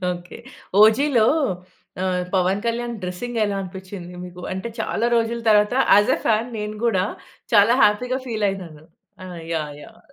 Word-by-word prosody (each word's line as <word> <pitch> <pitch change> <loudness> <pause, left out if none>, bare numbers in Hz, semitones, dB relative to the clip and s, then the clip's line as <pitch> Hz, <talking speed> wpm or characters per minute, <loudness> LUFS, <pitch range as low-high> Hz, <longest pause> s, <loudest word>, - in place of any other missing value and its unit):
Okay. 175 0 -9 0.4
ఓ‌జి‌లో 225 +1 +5 0.8
ఆహ్, 185 -1 0
Pawan 190 +2 +2
Kalyan 235 +1 -2
dressing 225 +7 -4
ఎలా 205 -1 -2
అనిపిచ్చింది 185 -1 -9
మీకు? 180 0 -10
అంటే 190 +5 -4
చాలా 225 +1 -1
రోజుల 230 0 0
తరువాత 210 +2 +4 0.2
ఆజ్ 205 +5 +4
ఏ - - -6
ఫ్యాన్ 225 +2 +2
నేను 210 0 -4
గూడా 190 -5 +2 0.5
చాలా 205 +4 +6
హ్యాపీ‌గా 250 +5 +2
ఫీల్ 220 -3 -1
అయినాను. 170 -6 -7 0.4
ఆ! - - -8 0.3
యాహ్! 150 -2 -3
యాహ్! - - -15
210 Hz, 150 wpm, -22 LUFS, 185-230 Hz, 0.8 s, చాలా